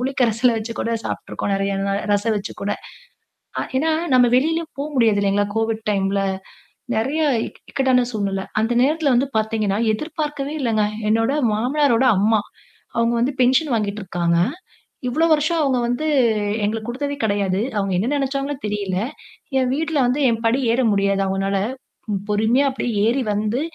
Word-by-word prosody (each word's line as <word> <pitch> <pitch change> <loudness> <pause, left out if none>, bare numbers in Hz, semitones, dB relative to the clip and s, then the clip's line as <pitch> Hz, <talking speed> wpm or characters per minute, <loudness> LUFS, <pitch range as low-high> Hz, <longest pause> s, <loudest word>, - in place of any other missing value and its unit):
புளி 265 +2 -1
கரைசல 235 0 +3
வச்சு 220 +1 -5
கூட 230 - -1
சாப்பிட்டுருக்கோம். 200 - -3
நெறைய 195 0 -1
நாள் 200 0 0
ரசம் 215 +2 +1
வச்சு 200 - -6
கூட. 205 - -1 0.9
அ - - 0 0.2
ஏன்னா, 320 +4 +1 0.2
நம்ம 245 -1 +5
வெளிலயும் 325 +5 0
போ - - 0
முடியாது 225 -4 +3
இல்லீங்களா? 200 +1 +2
கோவிட் 225 0 -1
டைம்ல 195 0 0 0.8
நெறைய 275 +8 0 0.3
இக் - - -19
இக்கட்டான 255 -2 +2
சூழ்நில. 195 -2 -2 0.2
அந்த 225 +2 +1
நேரத்தில 295 -1 +2
வந்து 265 +3 +1
பார்த்தீங்கன்னா, 215 -2 0 0.2
எதிர்பார்க்கவே 295 +1 -4
இல்லங்க. 225 -5 +1 0.3
என்னோட 225 +4 +2 0.2
மாமனாரோட 260 +1 +2
அம்மா, 215 +1 +3 0.6
அவங்க 230 0 +2
வந்து 270 +4 +1
பென்ஷன் 260 +2 +3
வாங்கிட்டுருக்காங்க. 190 -5 -1 0.7
இவ்வளோ 310 +7 +2
வருஷம் 310 +2 +2
அவங்க 265 -4 +2
வந்து 245 +6 -1 0.6
எங்களுக்கு 220 +2 -2
குடுத்ததே 285 +4 -3
கிடையாது. 200 -2 +1 0.2
அவங்க 195 -1 0
என்ன 205 +7 0
நெனைச்சாங்களோ 275 0 -1
தெரியில. 205 -3 -2 0.6
என் 255 -1 +1
வீட்ல 320 +1 -2
வந்து 260 +4 0
என் 225 -1 -1
படி 235 +3 +3
ஏற 245 - +1
முடியாது 200 0 +1
அவங்கனால, 195 +1 0 0.7
பொறுமையா 220 +7 +2
அப்டியே 250 -2 -3 0.2
ஏறி 255 +4 +2
வந்து 215 +4 -1
230 Hz, 150 wpm, -21 LUFS, 205-270 Hz, 0.9 s, நம்ம